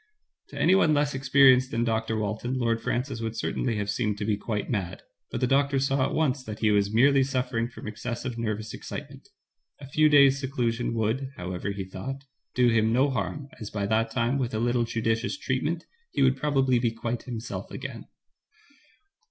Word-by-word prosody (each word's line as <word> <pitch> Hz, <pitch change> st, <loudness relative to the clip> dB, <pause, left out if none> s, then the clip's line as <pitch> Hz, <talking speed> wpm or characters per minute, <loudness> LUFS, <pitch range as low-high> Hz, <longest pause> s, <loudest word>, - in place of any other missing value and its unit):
To -, -, -11 dB
anyone 175 Hz, -3 st, +4 dB
less 145 Hz, 0 st, +1 dB
experienced 130 Hz, -1 st, +5 dB
than 115 Hz, -2 st, 0 dB
Dr. 110 Hz, -1 st, 0 dB
Walton, 110 Hz, +4 st, -2 dB
Lord 115 Hz, -2 st, 0 dB
Francis 125 Hz, -1 st, -2 dB
would 115 Hz, 0 st, -4 dB
certainly 115 Hz, +1 st, -1 dB
have 105 Hz, -1 st, -2 dB
seemed 105 Hz, 0 st, -1 dB
to 105 Hz, -, -3 dB
be 105 Hz, -1 st, +1 dB
quite 105 Hz, 0 st, -3 dB
mad, 95 Hz, -6 st, -3 dB, 0.3 s
but -, -, -4 dB
the -, -, +4 dB
doctor 140 Hz, +2 st, +2 dB
saw 135 Hz, 0 st, +1 dB
at -, -, -4 dB
once 140 Hz, -4 st, +1 dB
that 110 Hz, -3 st, -6 dB
he 110 Hz, -1 st, +2 dB
was 100 Hz, -1 st, +2 dB
merely 135 Hz, +5 st, +5 dB
suffering 125 Hz, -3 st, -1 dB
from 120 Hz, -, -11 dB
excessive 120 Hz, +3 st, -4 dB
nervous 110 Hz, -1 st, -3 dB
excitement. -, -, -8 dB, 0.5 s
A 140 Hz, -, -9 dB
few 155 Hz, +3 st, +3 dB
days* 140 Hz, -2 st, +6 dB
seclusion 120 Hz, -4 st, -1 dB
would, 115 Hz, +5 st, -1 dB
however, 90 Hz, +2 st, -4 dB
he 100 Hz, -1 st, -4 dB
thought, 130 Hz, +9 st, -6 dB, 0.3 s
do 125 Hz, -1 st, +4 dB
him 110 Hz, -1 st, +3 dB
no 130 Hz, +4 st, +3 dB
harm, 140 Hz, +2 st, -3 dB
as 110 Hz, -, -6 dB
by 100 Hz, -2 st, -2 dB
that 110 Hz, +2 st, +1 dB
time, 120 Hz, +3 st, 0 dB
with 120 Hz, -4 st, -2 dB
a -, -, 0 dB
little 120 Hz, 0 st, +1 dB
judicious 115 Hz, +1 st, -1 dB
treatment, 150 Hz, +6 st, -2 dB, 0.2 s
he -, -, +1 dB
would 130 Hz, 0 st, +4 dB
probably 135 Hz, -3 st, +2 dB
be 120 Hz, -1 st, +2 dB
quite 115 Hz, +1 st, -4 dB
himself 120 Hz, -1 st, -6 dB
again. -, -, -7 dB
120 Hz, 185 wpm, -27 LUFS, 110-135 Hz, 0.5 s, days